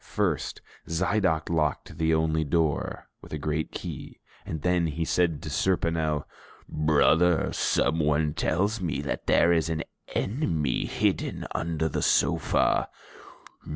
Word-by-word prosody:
First, - - -2 0.2
Zidoc 85 -1 +1
locked 75 -1 -1
the 80 0 +2
only 80 0 +2
door 80 0 -1
with - - -12
a - - -1
great 75 +1 -2
key - - -7 0.3
and 80 -2 -5
then 90 -2 +2
he 80 +2 -2
said 85 -3 +1
to - - -5
Serponel, 80 -3 0 0.4
"Brother, 80 +3 +3
someone 75 -1 +1
tells 100 +8 0
me 80 -6 -2
that 70 - -4
there 85 +1 +5
is 80 -1 +1
an 80 -1 -2 0.3
enemy 85 - 0
hidden - - -1
under 80 -1 -1
the 80 - -2
sofa." - - +2
80 Hz, 125 wpm, -27 LUFS, 75-85 Hz, 0.4 s, there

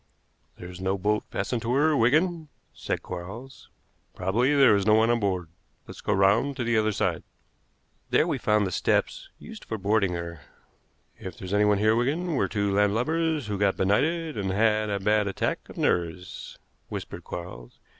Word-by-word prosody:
"There's 90 0 -9
no 95 +1 0
boat 105 +2 0
fastened 120 -3 -2
to 120 +2 -1
her, 150 +2 +3
Wigan," 155 +6 +2 0.2
said - - -4
Quarles. 95 +10 -9 0.5
"Probably 120 +10 +1
there 135 -6 +6
is 100 0 0
no 105 - +6
one 110 +1 +4
on 120 - +1
board. 95 -5 -1 0.4
Let's - - -11
go - - -2
round 105 +8 +2
to 125 - -1
the 120 0 0
other 110 0 +2
side." - - -1 0.9
There - - +3
we - - -2
found 105 -1 +2
the 95 - -3
steps - - 0
used - - -11
for 110 - -5
boarding 100 -2 +1
her. 85 -2 -6 0.8
"If 95 - -8
there's 95 0 -6
anyone 105 0 +3
here, 110 +2 +3
Wigan, 155 +9 0
we're 140 - +1
two 100 -2 -1
landlubbers 135 +10 +1
who've 105 -2 -4
got 100 -1 +2
benighted 155 - 0
and 95 -1 -2
have 110 +2 +2
a 100 -1 -1
bad 105 +1 +2
attack 95 - -3
of - - -12
nerves," 90 +1 -2 0.3
whispered - - -7
Quarles. 60 -9 -8
105 Hz, 175 wpm, -26 LUFS, 95-125 Hz, 0.9 s, there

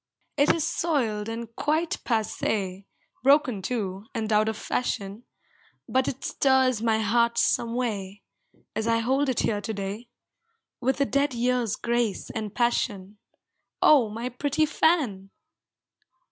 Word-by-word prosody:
It 285 0 +4
is 325 - 0
soiled 260 -11 -1
and 230 0 -6
quite 315 +3 -1
passe, 205 -4 -1 0.3
Broken 270 -5 +3
too, 200 -2 -3
and 220 -1 -1
out 215 +1 +3
of 220 - -4
fashion, 205 -2 -3 0.6
But 260 0 +1
it 265 - -4
stirs 260 -4 +2
my 225 -1 +2
heart 235 +2 +2
some 230 0 +1
way, 205 -5 -3 0.5
As 220 +1 -1
I 230 0 +3
hold 265 +5 +1
it 255 - +1
here 205 -2 0
to 220 - -4
day, 200 +4 -5 0.7
With 260 +2 0
a - - +4
dead 280 -1 0
year's 240 -3 +1
grace 235 -3 -1
and 215 -2 -5
passion. 210 -4 -1 0.6
Oh, 270 -8 +5
my 230 +4 -4
pretty 285 +5 0
fan! 280 - +1
235 Hz, 135 wpm, -26 LUFS, 210-260 Hz, 0.7 s, Oh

